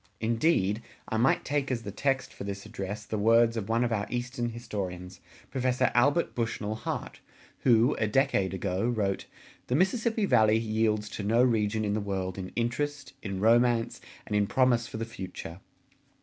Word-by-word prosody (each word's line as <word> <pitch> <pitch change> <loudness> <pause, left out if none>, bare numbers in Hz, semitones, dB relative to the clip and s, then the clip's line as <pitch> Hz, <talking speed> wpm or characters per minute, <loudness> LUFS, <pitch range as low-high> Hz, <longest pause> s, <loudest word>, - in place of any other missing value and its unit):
Indeed, 115 - +1 0.3
I 110 - -1
might 120 +4 +2
take 145 -2 -1
as 120 -3 -2
the 100 - -5
text 135 +2 -1
for - - -8
this 100 0 -5
address 105 -1 -5
the 110 - -3
words 115 +2 +4
of 110 -2 -4
one 115 +2 +2
of 120 - 0
our 105 -1 -1
Eastern 120 0 -2
historians, 95 -6 -6 0.3
Professor 130 -1 +1
Albert 145 +7 +3
Bushnell 115 -3 -2
Hart, 110 - -5 0.4
who, 120 +1 +4
a 110 - +2
decade 110 -5 +2
ago, 95 +3 -1
wrote: 100 -5 -1 0.4
The 125 - 0
Mississippi 220 - +1
Valley 110 - +4
yields 110 -1 0
to 105 - -5
no 115 +4 +3
region 110 -3 +1
in 105 - 0
the 105 - 0
world 95 -2 -3
in 95 0 -5
interest, 140 +4 -2
in 100 -2 -4
romance, 115 +1 +3 0.2
and 105 - -3
in 105 -1 +2
promise 125 -2 +2
for - - -7
the 115 - -3
future. 95 -5 -8
115 Hz, 175 wpm, -28 LUFS, 105-125 Hz, 0.4 s, words